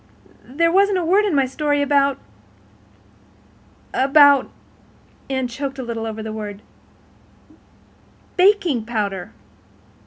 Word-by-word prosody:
There 335 Hz, +6 st, +1 dB
wasn't 395 Hz, +1 st, +3 dB
a 355 Hz, -, -2 dB
word 395 Hz, +5 st, +3 dB
in 385 Hz, -7 st, 0 dB
my 275 Hz, -1 st, +3 dB
story 290 Hz, +2 st, -1 dB, 2.1 s
about—about—" 280 Hz, 0 st, +4 dB, 0.8 s
Anne 260 Hz, -2 st, -1 dB
choked 270 Hz, +3 st, -6 dB
a 260 Hz, -, -5 dB
little 230 Hz, -2 st, -5 dB
over 220 Hz, 0 st, -6 dB
the 220 Hz, 0 st, -6 dB
word—"baking 240 Hz, -, -5 dB
powder." 200 Hz, -5 st, -3 dB
270 Hz, 95 wpm, -20 LUFS, 225-335 Hz, 2.1 s, about—about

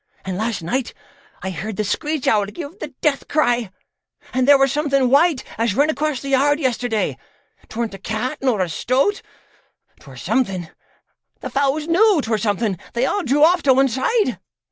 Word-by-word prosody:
An' 190 Hz, -1 st, -3 dB
last 215 Hz, -2 st, -2 dB
night 245 Hz, +9 st, -2 dB, 0.5 s
I 190 Hz, -, -3 dB
heard 195 Hz, +5 st, -5 dB
the 215 Hz, -, 0 dB
screech 300 Hz, +7 st, -2 dB
owl 205 Hz, -2 st, +3 dB
give 325 Hz, -, -8 dB
the -, -, -4 dB
death 290 Hz, -3 st, 0 dB
cry, 240 Hz, -7 st, +1 dB, 0.6 s
and 255 Hz, 0 st, +1 dB
there 285 Hz, -1 st, +8 dB
were 270 Hz, 0 st, +4 dB
something 275 Hz, -2 st, +1 dB
white 295 Hz, 0 st, +4 dB, 0.2 s
as 225 Hz, -3 st, +1 dB
run 290 Hz, +4 st, +3 dB
across 300 Hz, -1 st, -2 dB
the 275 Hz, -, -5 dB
yard 285 Hz, +2 st, +3 dB
yesterday; 245 Hz, -5 st, -1 dB, 0.5 s
'tweren't 225 Hz, -1 st, -3 dB
a 195 Hz, -, -9 dB
cat 220 Hz, +6 st, -3 dB
nor 250 Hz, -7 st, +1 dB
a 185 Hz, -, +1 dB
stoat, 265 Hz, -, 0 dB, 0.8 s
'twere -, -, -14 dB
something. 190 Hz, -10 st, -1 dB, 0.7 s
The -, -, -6 dB
fowls 280 Hz, +2 st, 0 dB
knew 380 Hz, +2 st, +4 dB
'twere 220 Hz, -1 st, -1 dB
something; 205 Hz, -2 st, -1 dB
they 235 Hz, +2 st, +1 dB
all 410 Hz, +8 st, 0 dB
drew 290 Hz, -1 st, +2 dB
off 345 Hz, +2 st, +5 dB
to 265 Hz, -2 st, +4 dB
one 270 Hz, +1 st, +4 dB
side. 260 Hz, -, 0 dB
260 Hz, 175 wpm, -20 LUFS, 220-295 Hz, 0.8 s, there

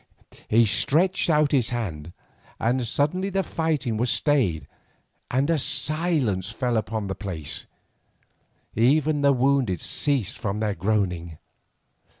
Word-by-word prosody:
He 115 Hz, +2 st, +4 dB
stretched 170 Hz, -, +1 dB
out 150 Hz, -2 st, +3 dB
his 130 Hz, -5 st, +2 dB
hand, 85 Hz, -10 st, -5 dB, 0.5 s
and 120 Hz, +1 st, 0 dB
suddenly 180 Hz, -, 0 dB
the 195 Hz, 0 st, -1 dB
fighting 155 Hz, -11 st, -2 dB
was 120 Hz, +3 st, 0 dB
stayed 110 Hz, -, +1 dB, 0.6 s
and 130 Hz, +3 st, +1 dB
a 165 Hz, -2 st, +1 dB
silence 145 Hz, -, +2 dB
fell 120 Hz, +2 st, -2 dB
upon 110 Hz, -1 st, -2 dB
the 95 Hz, -, -3 dB
place, 90 Hz, -8 st, -5 dB, 1.1 s
even 145 Hz, +6 st, +2 dB
the 140 Hz, 0 st, +4 dB
wounded 130 Hz, -7 st, +1 dB
ceased 130 Hz, -8 st, -1 dB
from 105 Hz, -2 st, -3 dB
their 105 Hz, -2 st, -1 dB
groaning. 90 Hz, -4 st, -2 dB
120 Hz, 125 wpm, -24 LUFS, 100-145 Hz, 1.1 s, He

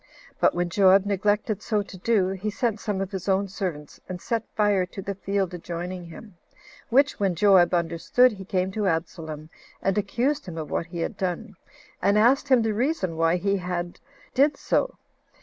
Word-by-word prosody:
But -, -, +3 dB
when 175 Hz, 0 st, -1 dB
Joab 195 Hz, +1 st, +5 dB
neglected 205 Hz, +1 st, 0 dB
so 210 Hz, -2 st, 0 dB
to 200 Hz, -, -12 dB
do, 190 Hz, 0 st, +1 dB
he 195 Hz, +2 st, -3 dB
sent 225 Hz, 0 st, -1 dB
some 205 Hz, -3 st, -2 dB
of 195 Hz, 0 st, -4 dB
his 190 Hz, 0 st, -4 dB
own 195 Hz, +1 st, +2 dB
servants, 180 Hz, -7 st, -5 dB
and 180 Hz, -1 st, -5 dB
set 230 Hz, +4 st, -1 dB
fire 205 Hz, -3 st, +3 dB
to 190 Hz, -, -10 dB
the 195 Hz, +1 st, -3 dB
field 195 Hz, -1 st, -2 dB
adjoining 175 Hz, +1 st, -5 dB
to -, -, -12 dB
him; 190 Hz, +2 st, -12 dB, 0.5 s
which, 275 Hz, +4 st, +3 dB
when 195 Hz, -3 st, +1 dB
Joab 185 Hz, -1 st, +5 dB
understood, 170 Hz, +9 st, +3 dB
he 195 Hz, -3 st, -8 dB
came 185 Hz, 0 st, -1 dB
to 210 Hz, 0 st, -1 dB
Absalom, 160 Hz, -2 st, -3 dB, 0.3 s
and 195 Hz, 0 st, 0 dB
accused 245 Hz, +7 st, -1 dB
him 170 Hz, -2 st, -7 dB
of 155 Hz, -2 st, -5 dB
what 165 Hz, -, -1 dB
he 170 Hz, 0 st, -5 dB
had 195 Hz, -, -3 dB
done; 195 Hz, +3 st, -3 dB, 0.5 s
and 200 Hz, +1 st, +3 dB
asked 260 Hz, +6 st, +4 dB
him 255 Hz, -4 st, +5 dB
the 220 Hz, -1 st, 0 dB
reason 225 Hz, -, -1 dB
why 165 Hz, +1 st, +2 dB
he 195 Hz, +2 st, 0 dB, 0.7 s
did 280 Hz, +2 st, +3 dB
so. -, -, 0 dB
195 Hz, 185 wpm, -25 LUFS, 175-215 Hz, 0.7 s, Joab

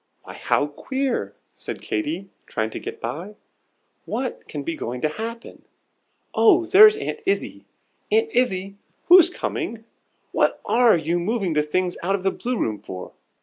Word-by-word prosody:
"Why, -, -, -10 dB
how 145 Hz, -, +1 dB
queer!" 260 Hz, -, -3 dB, 0.2 s
said -, -, -7 dB
Katy, 300 Hz, -, -3 dB, 0.2 s
trying 110 Hz, -1 st, -2 dB
to -, -, -5 dB
get -, -, -7 dB
by. 165 Hz, -, -5 dB, 0.7 s
"What 255 Hz, 0 st, -4 dB
can 145 Hz, -2 st, -5 dB
be 165 Hz, +3 st, -3 dB
going 125 Hz, -3 st, -5 dB
to 155 Hz, -, +1 dB
happen? 230 Hz, +7 st, -7 dB, 0.7 s
Oh, 360 Hz, -5 st, +5 dB
there's 420 Hz, +4 st, +8 dB
Aunt 435 Hz, -, -4 dB
Izzie! 395 Hz, +1 st, -2 dB, 0.5 s
Aunt 445 Hz, +1 st, +2 dB
Izzie, 195 Hz, -5 st, 0 dB, 0.3 s
who's 355 Hz, -1 st, +9 dB
coming? 290 Hz, -, -4 dB, 0.5 s
What -, -, +1 dB
are 235 Hz, -5 st, +4 dB
you 165 Hz, +2 st, -1 dB
moving 195 Hz, -1 st, -1 dB
the 150 Hz, -, +3 dB
things 175 Hz, +4 st, -1 dB
out 195 Hz, +3 st, +1 dB
of 190 Hz, -, -5 dB
the 195 Hz, -, +2 dB
Blue 250 Hz, 0 st, -3 dB
room 110 Hz, -, -1 dB
for?" 90 Hz, -1 st, -8 dB
210 Hz, 155 wpm, -23 LUFS, -, 0.7 s, who's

